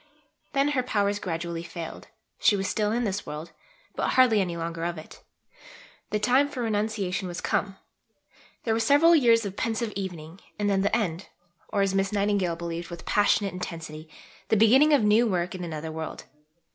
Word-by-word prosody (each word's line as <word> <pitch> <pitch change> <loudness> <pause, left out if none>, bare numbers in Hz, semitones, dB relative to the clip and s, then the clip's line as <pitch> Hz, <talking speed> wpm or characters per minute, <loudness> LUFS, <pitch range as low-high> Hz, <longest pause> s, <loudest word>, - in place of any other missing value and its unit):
Then 275 0 +2
her 280 -3 +1
powers 205 -4 0
gradually 170 -2 -4
failed; 170 -1 -8 0.3
she 205 - +4
was 195 -1 -1
still 210 -1 0
in 240 +2 0
this 200 -2 -2
world, 150 +3 -7 0.4
but - - 0
hardly 245 -5 +5
any 175 -3 -2
longer 165 0 -4
of 170 0 -2
it. 155 - -11 0.9
The 210 - 0
time 260 +6 +3
for 255 -4 -4
renunciation 210 -3 -1
was 175 -1 -5
come. 195 -1 -1 0.9
There 225 - +1
were 225 - +1
several 290 +9 +5
years 230 -6 +4
of 195 -1 -5
pensive 225 -1 -2
evening; 175 -3 -6 0.2
and 205 -1 -1
then, 195 -1 +2
the 200 - +2
end 185 -5 -3 0.4
or, 200 - +1
as 195 -1 0
Miss 195 +1 +1
Nightingale 200 -4 +1
believed 170 0 -5
with 170 -1 -9
passionate 205 -1 +2
intensity, 165 -3 -7 0.4
the 220 - +3
beginning 260 +8 +6
of 285 -6 +4
new 215 +3 +4
work 180 -3 -1
in 185 -1 -6
another 160 -1 -5
world. 160 0 -6
200 Hz, 180 wpm, -26 LUFS, 170-225 Hz, 0.9 s, beginning